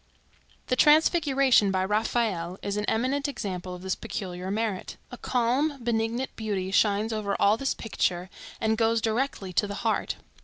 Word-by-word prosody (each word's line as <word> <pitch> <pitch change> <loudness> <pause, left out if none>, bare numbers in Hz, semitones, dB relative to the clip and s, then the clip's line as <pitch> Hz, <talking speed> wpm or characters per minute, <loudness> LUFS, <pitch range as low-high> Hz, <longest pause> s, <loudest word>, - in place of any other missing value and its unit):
The 255 - 0
Transfiguration, 280 - +4
by 190 -1 +1
Raphael, 210 -4 0
is 200 0 -2
an 210 0 -1
eminent 260 +7 0
example 185 -9 -5
of 180 - -11
this 190 0 -1
peculiar 185 -1 -5
merit. 210 -2 -2
A - - -6
calm 255 +5 +1
benignant 235 +2 -1
beauty 200 -4 -3
shines 210 +2 +2
over 205 -2 -2
all 205 +1 +5
this 270 +3 -1
picture, 185 -4 -2 0.3
and 220 0 0
goes 225 0 +3
directly 220 -4 -2
to 170 +5 +2
the 200 - -5
heart. 220 - 0
220 Hz, 155 wpm, -27 LUFS, 195-245 Hz, 0.3 s, all